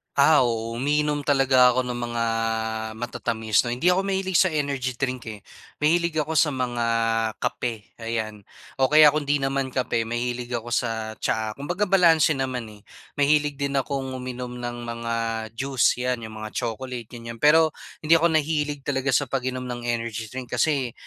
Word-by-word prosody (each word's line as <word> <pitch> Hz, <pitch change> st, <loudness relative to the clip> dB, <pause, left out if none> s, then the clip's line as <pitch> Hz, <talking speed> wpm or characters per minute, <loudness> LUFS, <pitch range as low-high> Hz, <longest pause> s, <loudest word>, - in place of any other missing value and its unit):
Ah, 140 Hz, -2 st, +5 dB
oo 115 Hz, 0 st, -2 dB
uminom 150 Hz, +2 st, 0 dB
talaga 130 Hz, -3 st, +5 dB
ako 130 Hz, -, +2 dB
ng 120 Hz, -, -3 dB
mga 120 Hz, -1 st, -2 dB, 0.8 s
matatamis 110 Hz, -2 st, 0 dB
'no. 120 Hz, -, -1 dB
Hindi 165 Hz, +9 st, +2 dB
ako 190 Hz, +2 st, +2 dB
mahilig 190 Hz, -2 st, 0 dB
sa 185 Hz, -4 st, +3 dB
energy 140 Hz, -4 st, -1 dB
drink, 130 Hz, -1 st, -3 dB
eh. 105 Hz, -3 st, -7 dB, 0.4 s
Mahilig 170 Hz, +2 st, +2 dB
ako 155 Hz, +1 st, -2 dB
sa 150 Hz, -1 st, +3 dB
mga 120 Hz, -2 st, -1 dB, 0.6 s
kape 115 Hz, -4 st, -4 dB
ayan. 110 Hz, -3 st, -4 dB, 0.3 s
O 135 Hz, -, +4 dB
kaya 155 Hz, -1 st, +9 dB
kung 150 Hz, -1 st, -2 dB
'di 145 Hz, 0 st, +1 dB
naman 135 Hz, -1 st, -1 dB
kape, 120 Hz, -3 st, 0 dB
mahilig 120 Hz, +1 st, -3 dB
ako 120 Hz, 0 st, -3 dB
sa 110 Hz, -2 st, -2 dB
tsaa. 110 Hz, -1 st, -2 dB
Kumbaga 175 Hz, +8 st, -2 dB
balanse 165 Hz, -6 st, +5 dB
naman 125 Hz, -4 st, -3 dB
eh. 105 Hz, -1 st, -16 dB, 0.3 s
Mahilig 145 Hz, 0 st, +2 dB
din 140 Hz, 0 st, -2 dB
akong 135 Hz, -1 st, -2 dB
uminom 125 Hz, -1 st, -6 dB
ng 120 Hz, -1 st, -6 dB
mga 115 Hz, 0 st, -4 dB, 0.4 s
juice 130 Hz, -2 st, +2 dB
yan, 125 Hz, -2 st, -1 dB
yung 110 Hz, -, -10 dB
mga 110 Hz, -, -8 dB
chocolate 120 Hz, 0 st, -5 dB
ganiyan. 115 Hz, -1 st, -9 dB
Pero, 155 Hz, +1 st, +5 dB, 0.3 s
hindi 160 Hz, -, +5 dB
ako 165 Hz, -1 st, +4 dB
nahilig 150 Hz, -2 st, -1 dB
talaga 140 Hz, -1 st, -1 dB
sa 135 Hz, +3 st, +3 dB
pag-inom 130 Hz, -1 st, -3 dB
ng 120 Hz, -1 st, -5 dB
energy 115 Hz, -2 st, -3 dB
drink, 125 Hz, -1 st, -7 dB
kasi 130 Hz, -2 st, +1 dB
130 Hz, 170 wpm, -24 LUFS, 120-145 Hz, 0.8 s, kaya